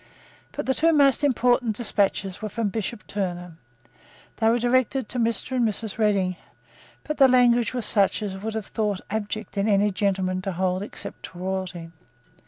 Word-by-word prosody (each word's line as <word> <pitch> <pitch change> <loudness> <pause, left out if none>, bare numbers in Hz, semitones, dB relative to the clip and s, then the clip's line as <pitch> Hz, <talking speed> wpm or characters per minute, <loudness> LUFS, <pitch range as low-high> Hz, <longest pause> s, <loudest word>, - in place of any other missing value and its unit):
But - - -4
the 265 - +2
two 330 +4 +3
most 280 -2 +4
important 245 -4 +2
despatches 200 -3 0
were 215 - -3
from 215 0 -1
Bishop 220 +1 -4
Turner. 180 -3 -4 0.9
They 220 -1 +3
were 235 - +3
directed 255 +1 +1
to 250 - -2
Mr. 230 +2 -1
and 235 -3 +3
Mrs. 215 0 -5
Redding: 195 -4 +1 0.7
but 305 - -4
the 270 - +7
language 245 -1 +3
was 245 -4 -1
such 205 +1 +3
as 200 -2 -3
it 190 - -8
would 220 +1 -4
be 220 - -1
thought 205 -1 -2
abject 215 -1 -3
in 200 - +1
any 205 0 +3
gentleman 185 -2 0
to 195 0 -3
hold 185 +1 0
except 205 - -8
to - - -12
royalty. 180 -2 -4
215 Hz, 180 wpm, -24 LUFS, 190-240 Hz, 0.9 s, the